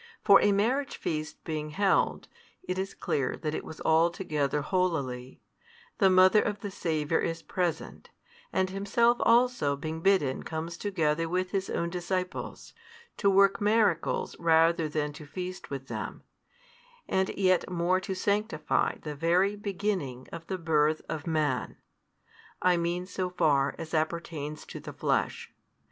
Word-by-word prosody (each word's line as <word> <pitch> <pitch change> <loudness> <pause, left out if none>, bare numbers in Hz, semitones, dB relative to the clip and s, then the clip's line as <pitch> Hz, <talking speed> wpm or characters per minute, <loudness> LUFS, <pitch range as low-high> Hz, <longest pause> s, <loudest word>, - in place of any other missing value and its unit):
For 200 -2 +7
a 205 - +4
marriage 250 +8 0
feast 155 -1 -4
being 155 -1 -4
held 195 +6 +1 0.4
(it 185 +1 -3
is 195 +1 -4
clear 135 -3 -1
that 155 -2 -3
it - - -3
was 160 - -10
altogether 160 -3 +1
holily), 140 -9 -2 0.6
the 195 - +6
mother 185 +3 +6
of 205 -1 -3
the 205 - -5
Saviour 160 -4 0
is 165 0 -2
present, 175 -3 -3 0.4
and 185 0 0
Himself 235 +5 +2
also 235 - +3
being 160 +3 -5
bidden 165 -9 +2
comes 165 +1 -5
together 165 -4 0
with 185 +1 -1
His 195 -1 -1
own 170 0 -2
disciples, 180 +1 -4 0.4
to 200 - +3
work 195 +2 +4
miracles 210 -5 +1
rather 165 -1 +3
than 150 -1 -2
to 150 0 -11
feast 180 +3 -6
with 135 -1 -5
them, - - -6 0.8
and 190 0 +1
yet 185 -2 +2
more 180 +1 +1
to 190 +1 -4
sanctify 205 +3 0
the 150 - -4
very 175 +7 +2
beginning 190 - -3
of 165 0 -8
the 190 - -2
birth 155 -2 +1
of 155 -1 -4
man: 150 -5 -1 0.8
I 180 -1 +3
mean 175 +1 -1
so 185 -1 -3
far 145 -6 +2
as 165 -1 -8
appertains 155 -2 -3
to - - -8
the - - -9
flesh. - - -1
170 Hz, 145 wpm, -29 LUFS, 155-190 Hz, 0.8 s, For